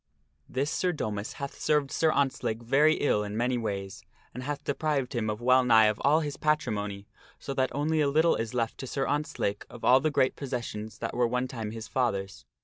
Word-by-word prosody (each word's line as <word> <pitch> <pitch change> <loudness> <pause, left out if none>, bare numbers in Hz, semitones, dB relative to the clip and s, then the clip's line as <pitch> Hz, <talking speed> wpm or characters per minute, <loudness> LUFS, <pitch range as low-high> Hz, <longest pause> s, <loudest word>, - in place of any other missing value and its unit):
This 140 +4 -1
Sir 180 - +1
Domas 105 -7 -4
hath 140 -1 -7
served 150 -2 +1
Sir 160 -1 +2
Ontzlake 130 -5 -1
very 145 +6 +4
ill 105 -7 +1
in 105 +1 -5
many 125 +2 +1
ways, 100 -4 -4 0.3
and 125 - -6
hath 145 +2 -4
deprived 145 -2 -1
him 110 -3 -1
of 105 +2 -3
well 130 +1 +5
nigh 110 -3 +6
all 145 +4 +4
of 160 - 0
his 145 -2 -4
patrimony, 105 -10 -1 0.3
so 140 - -5
that 130 -1 +1
only 155 +2 +1
a 145 - +3
little 160 +4 +3
is 115 +1 -4
left 115 -2 -1
to 130 - -5
Sir 135 +1 -1
Ontzlake 145 -8 -1
of 120 - -12
all 130 +1 +7
the 155 +3 +1
great 130 -3 +2
possessions 120 -5 -5
that - - -4
were 120 -1 +2
one 125 +2 -1
time 115 -5 -5
his 110 0 -7
father's. 95 - -2
125 Hz, 210 wpm, -28 LUFS, 110-145 Hz, 0.3 s, all